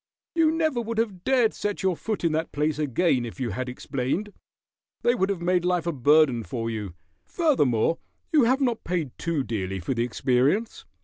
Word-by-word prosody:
"You 330 -2 +4
never 315 -6 0
would 230 0 -4
have 205 -6 -1
dared 250 -4 +3
set 205 -1 -3
your 190 -2 +2
foot 215 +3 -4
in 165 - +2
that 160 +1 -1
place 150 +1 -1
again 145 -2 +1
if 120 +2 -7
you 125 -4 -2
had 130 +6 -3
explained. 135 +11 -3 0.7
They 240 - +4
would 195 -5 0
have 185 -4 -2
made 180 0 +2
life 180 -2 +1
a 170 - 0
burden 145 -2 +4
to 115 -4 -4
you. 105 -6 -5 0.3
Furthermore, 165 - +1 0.3
you 295 -6 +5
have 260 +4 +2
not 240 -4 0
paid 170 -6 -2
too 165 -5 -1
dearly 95 -5 -3
for 90 +9 -2
the 115 -1 0
experience. 130 - 0
165 Hz, 190 wpm, -25 LUFS, -, 0.7 s, you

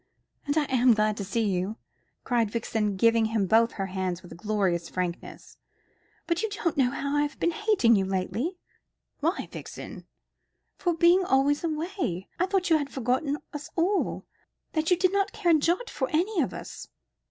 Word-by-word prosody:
"And 285 +2 0
I 310 - +4
am 255 -3 +4
glad 215 0 +1
to 200 - -3
see 215 +3 -1
you," 190 +3 -1 0.5
cried 235 -3 +1
Vixen, 215 -2 -1
giving 230 +3 +4
him 220 -2 0
both 225 +4 +3
her 195 - -3
hands 185 -1 -3
with 175 - -13
a - - -8
glorious 190 -3 -1
frankness; 180 -2 -5 0.7
"but 340 +2 0
you 445 - -1
don't 375 -5 -2
know 265 -3 +3
how 280 +2 -2
I 290 - +3
have 295 0 -3
been 345 - +2
hating 375 - +3
you 195 - +2
lately." 195 - -2 0.6
"Why, 330 +6 -1
Vixen?" - - -9 0.7
"For 350 -3 +1
being 345 +3 +5
always 285 -1 +2
away. 315 - -3
I 365 - +2
thought 375 -3 0
you 315 - +6
had 285 -1 -4
forgotten 265 +4 -1 0.2
us 295 0 -6
all 370 +4 0 0.5
that 315 0 0
you 360 - +4
did 370 0 +2
not 395 0 +1
care 345 - +1
a - - +3
jot 350 +10 +1
for 260 - -3
any 355 +4 +1
of 265 - -1
us." - - -8
270 Hz, 185 wpm, -27 LUFS, 210-340 Hz, 0.7 s, you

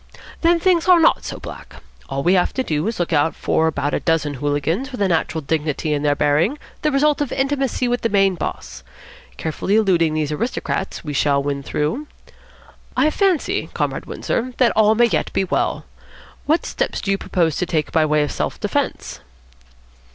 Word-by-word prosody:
Then 340 0 +4
things 350 -1 +2
are 360 -2 +7
not 325 - +4
so - - -5
black. - - -10 0.3
All 135 0 -2
we 180 - +4
have 180 -2 +2
to 260 - 0
do 155 -3 -1
is 225 - -2
to 175 - 0
look 170 - -5
out 150 +1 +2
for 160 - +1
about 145 -2 -1
a - - +1
dozen 165 -3 0
hooligans 145 - -1
with 250 - -7
a 200 - +2
natural 165 -2 0
dignity 150 +1 -1
in 145 - -1
their 145 -1 +2
bearing, 150 - +2 0.2
the 305 - +1
result 295 +2 +2
of 285 - -2
intimacy 270 -2 0
with 245 0 0
the 230 - 0
main 195 -2 +3
boss. 175 - -6 0.6
Carefully 165 +5 -1
eluding 175 -7 +3
these 155 -1 -1
aristocrats, 230 +11 -3
we 150 -2 -5
shall 140 0 +2
win 140 -1 -2
through. 155 - -2 0.9
I 290 +4 +3
fancy, 375 -3 0
Comrade - - -2
Windsor, 250 +1 -3
that 250 -2 +4
all 215 0 +4
may 240 +2 +5
yet 235 - -1
be - - +1
well. 190 - -1 0.6
What 315 +3 +2
steps - - -2
do 195 - -2
you 195 - 0
propose 165 -4 0
to 180 - -1
take 155 -3 -1
by 160 - +3
way 150 -1 +2
of 145 - -3
self - - -3
defence?" - - -2
180 Hz, 195 wpm, -20 LUFS, -, 0.9 s, are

